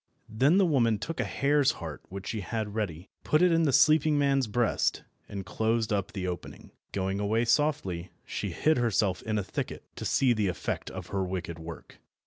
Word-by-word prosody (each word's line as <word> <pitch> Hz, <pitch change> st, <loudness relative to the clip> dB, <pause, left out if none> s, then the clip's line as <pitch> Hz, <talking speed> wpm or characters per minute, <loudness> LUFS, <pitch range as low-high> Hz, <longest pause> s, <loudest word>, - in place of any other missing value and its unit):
Then 135 Hz, -, +3 dB
the 195 Hz, -, +5 dB
woman 120 Hz, -9 st, +3 dB
took 165 Hz, +9 st, -5 dB
a -, -, +2 dB
hare's 145 Hz, 0 st, +2 dB
heart -, -, -7 dB
which 100 Hz, +1 st, -7 dB
she 110 Hz, -, -3 dB
had 110 Hz, 0 st, -3 dB
ready, 95 Hz, -5 st, -4 dB
put 155 Hz, +4 st, +3 dB
it 180 Hz, -, +5 dB
in 165 Hz, 0 st, +3 dB
the 145 Hz, -, +3 dB
sleeping 155 Hz, +2 st, +5 dB
man's 135 Hz, -3 st, +2 dB
breast, 115 Hz, +1 st, +1 dB, 0.3 s
and 100 Hz, -2 st, -5 dB
closed 110 Hz, +3 st, 0 dB
up 100 Hz, 0 st, -1 dB
the 95 Hz, -3 st, -3 dB
opening. 90 Hz, -1 st, -6 dB, 0.2 s
Going 95 Hz, 0 st, -1 dB
away 110 Hz, +3 st, +1 dB
softly, 115 Hz, -, 0 dB
she -, -, -3 dB
hid 155 Hz, +1 st, +2 dB
herself 105 Hz, -6 st, +1 dB
in 110 Hz, -1 st, -2 dB
a 105 Hz, -, 0 dB
thicket, -, -, -5 dB
to -, -, -5 dB
see 130 Hz, -3 st, +3 dB
the 105 Hz, -3 st, 0 dB
effect 90 Hz, -, -3 dB
of -, -, -8 dB
her 95 Hz, -1 st, -1 dB
wicked 90 Hz, -3 st, -4 dB
work. 80 Hz, 0 st, -10 dB
110 Hz, 195 wpm, -29 LUFS, 95-140 Hz, 0.3 s, the